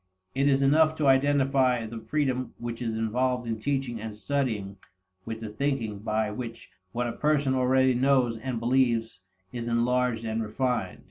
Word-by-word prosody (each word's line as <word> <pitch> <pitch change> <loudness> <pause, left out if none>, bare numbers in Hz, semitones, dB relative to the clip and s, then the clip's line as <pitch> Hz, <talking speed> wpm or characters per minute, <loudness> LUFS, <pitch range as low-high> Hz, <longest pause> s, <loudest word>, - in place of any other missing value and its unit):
It 135 +1 +2
is 140 -1 +3
enough 155 +3 +4
to 155 - -1
identify 135 -3 +3
the 115 +1 -6
freedom 130 +1 -1
which 120 0 -6
is 115 -2 -2
involved 125 +3 0
in 115 -1 -3
teaching 130 -2 -2
and 110 -1 -6
studying 110 -6 -2 0.5
with 115 0 -5
the 110 - -5
thinking 115 -3 -2
by 110 0 -1
which 115 0 -7 0.2
what 120 +3 -1
a 120 - -1
person 150 -3 +1
already 130 0 +3
knows 125 -2 +2
and 120 +1 -4
believes 115 -5 +1 0.3
is 120 -1 -4
enlarged 120 0 +1
and 110 0 -1
refined. 125 +3 -2
125 Hz, 160 wpm, -27 LUFS, 115-135 Hz, 0.5 s, enough